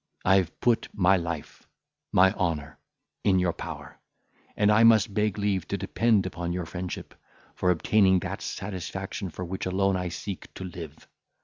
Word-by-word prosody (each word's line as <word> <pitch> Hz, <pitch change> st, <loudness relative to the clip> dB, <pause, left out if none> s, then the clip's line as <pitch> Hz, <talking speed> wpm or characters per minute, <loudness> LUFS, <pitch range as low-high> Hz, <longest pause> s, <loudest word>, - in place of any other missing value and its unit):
I 95 Hz, +1 st, +6 dB
have 90 Hz, -3 st, -1 dB
put 120 Hz, -2 st, +2 dB
my 95 Hz, -1 st, +4 dB
life, 85 Hz, -4 st, -5 dB, 0.4 s
my 95 Hz, +1 st, +5 dB
honour, 80 Hz, -5 st, -2 dB, 0.4 s
in 95 Hz, -2 st, +4 dB
your 90 Hz, -2 st, +1 dB
power; -, -, -8 dB, 0.6 s
and 105 Hz, 0 st, +4 dB
I 110 Hz, +2 st, +5 dB
must 110 Hz, -2 st, +5 dB
beg 105 Hz, 0 st, 0 dB
leave 100 Hz, -4 st, 0 dB
to 100 Hz, -, -2 dB
depend 100 Hz, +1 st, +2 dB
upon 85 Hz, -1 st, -3 dB
your 90 Hz, -1 st, -3 dB
friendship, 90 Hz, +2 st, -6 dB, 0.4 s
for 90 Hz, -, 0 dB
obtaining 95 Hz, +2 st, +4 dB
that -, -, -5 dB
satisfaction 95 Hz, 0 st, -5 dB
for 90 Hz, +3 st, -6 dB
which 95 Hz, +2 st, -4 dB
alone 95 Hz, +1 st, +1 dB
I 90 Hz, -1 st, -2 dB
seek 95 Hz, +2 st, -6 dB
to -, -, -6 dB
live. 85 Hz, -4 st, -9 dB
95 Hz, 165 wpm, -27 LUFS, 90-100 Hz, 0.6 s, I